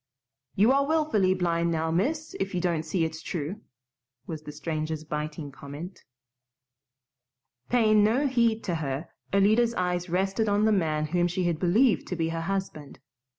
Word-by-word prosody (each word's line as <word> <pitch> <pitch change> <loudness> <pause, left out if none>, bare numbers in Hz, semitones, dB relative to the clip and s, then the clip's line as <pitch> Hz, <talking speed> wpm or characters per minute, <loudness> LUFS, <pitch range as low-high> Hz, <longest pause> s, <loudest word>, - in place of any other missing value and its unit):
"You 215 +6 +5
are 275 +1 +3
willfully 285 -13 +2
blind 170 -2 0
now, 160 0 0
miss, 300 - -1
if 195 -1 -2
you - - +1
don't 170 -3 0
see 165 +1 -1
it's 160 0 -5
true," 170 +6 -4 0.6
was 160 -2 -6
the 150 - -8
stranger's 155 0 -3
biting 150 -1 -5
comment. 145 +7 -9 1.6
Paying 215 -3 +4
no 235 +7 +2
heed 235 -4 +2
to 180 - -2
her, 140 +2 -3 0.2
Alida's 220 +4 +3
eyes 180 0 -1
rested 195 +5 0
on 205 +1 +2
the 220 - +4
man 155 -6 +1
whom 175 0 +3
she 180 +1 -2
had 170 -3 0
believed 205 +8 +3
to 180 - -3
be 165 -1 -1
her 165 0 -3
husband. 190 -5 -4
180 Hz, 160 wpm, -27 LUFS, 160-215 Hz, 1.6 s, You